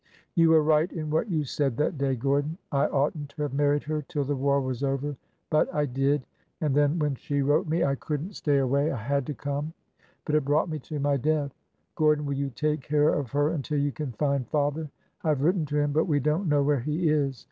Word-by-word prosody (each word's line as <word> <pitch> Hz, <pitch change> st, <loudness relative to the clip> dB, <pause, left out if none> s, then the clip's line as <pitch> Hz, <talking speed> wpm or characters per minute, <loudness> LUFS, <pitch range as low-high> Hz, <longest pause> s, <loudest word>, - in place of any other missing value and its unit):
You 165 Hz, -3 st, +4 dB
were 160 Hz, -1 st, +6 dB
right 155 Hz, +2 st, +3 dB
in 155 Hz, -3 st, -4 dB
what 160 Hz, +8 st, 0 dB
you 160 Hz, -4 st, 0 dB
said 135 Hz, -2 st, -1 dB
that 150 Hz, 0 st, 0 dB
day, 135 Hz, -1 st, +1 dB
Gordon. 140 Hz, +5 st, 0 dB
I 140 Hz, -1 st, +2 dB
ought 140 Hz, +3 st, +1 dB
n't 145 Hz, -2 st, -6 dB
to 150 Hz, +1 st, -5 dB
have 145 Hz, -3 st, -3 dB
married 145 Hz, +1 st, +2 dB
her 155 Hz, 0 st, -2 dB
till 150 Hz, 0 st, -3 dB
the 145 Hz, +1 st, -1 dB
war 140 Hz, +1 st, +2 dB
was 130 Hz, -1 st, -3 dB
over. 140 Hz, +1 st, -1 dB, 0.4 s
But— 155 Hz, -, +2 dB
I 150 Hz, 0 st, +2 dB
did; 135 Hz, +1 st, 0 dB, 0.3 s
and 150 Hz, -4 st, 0 dB
then, 145 Hz, +3 st, +3 dB
when 150 Hz, -3 st, +1 dB
she 140 Hz, +2 st, -2 dB
wrote 145 Hz, +4 st, +2 dB
me— 160 Hz, +2 st, +1 dB
I 140 Hz, -, +2 dB
couldn't 150 Hz, +7 st, -4 dB
stay 145 Hz, -6 st, +1 dB
away. 140 Hz, +3 st, +2 dB
I 135 Hz, -, -3 dB
had 140 Hz, +4 st, -1 dB
to 150 Hz, -, -3 dB
come! 145 Hz, +3 st, -3 dB, 0.5 s
But 150 Hz, -, -2 dB
it 155 Hz, -1 st, +3 dB
brought 150 Hz, +5 st, +1 dB
me 155 Hz, -1 st, -3 dB
to 150 Hz, +2 st, -6 dB
my 140 Hz, 0 st, +2 dB
death. 145 Hz, 0 st, 0 dB, 0.4 s
Gordon, 150 Hz, -1 st, +2 dB
will 140 Hz, -, -1 dB
you 140 Hz, 0 st, -2 dB
take 150 Hz, +3 st, -1 dB
care 150 Hz, +2 st, +2 dB
of 140 Hz, -5 st, -1 dB
her 145 Hz, +1 st, +2 dB
until 150 Hz, -2 st, -2 dB
you 145 Hz, 0 st, +1 dB
can 150 Hz, -2 st, -5 dB
find 140 Hz, 0 st, 0 dB
father? 150 Hz, +2 st, -1 dB, 0.3 s
I 160 Hz, -, +1 dB
have 145 Hz, -3 st, +1 dB
written 170 Hz, -1 st, +2 dB
to 145 Hz, +1 st, -1 dB
him, 145 Hz, 0 st, +1 dB
but 155 Hz, +3 st, +2 dB
we 150 Hz, -5 st, +2 dB
don't 155 Hz, +6 st, 0 dB
know 145 Hz, -1 st, +3 dB
where 145 Hz, -1 st, +2 dB
he 155 Hz, +7 st, -1 dB
is. 140 Hz, -5 st, +1 dB
145 Hz, 240 wpm, -27 LUFS, 140-155 Hz, 0.5 s, were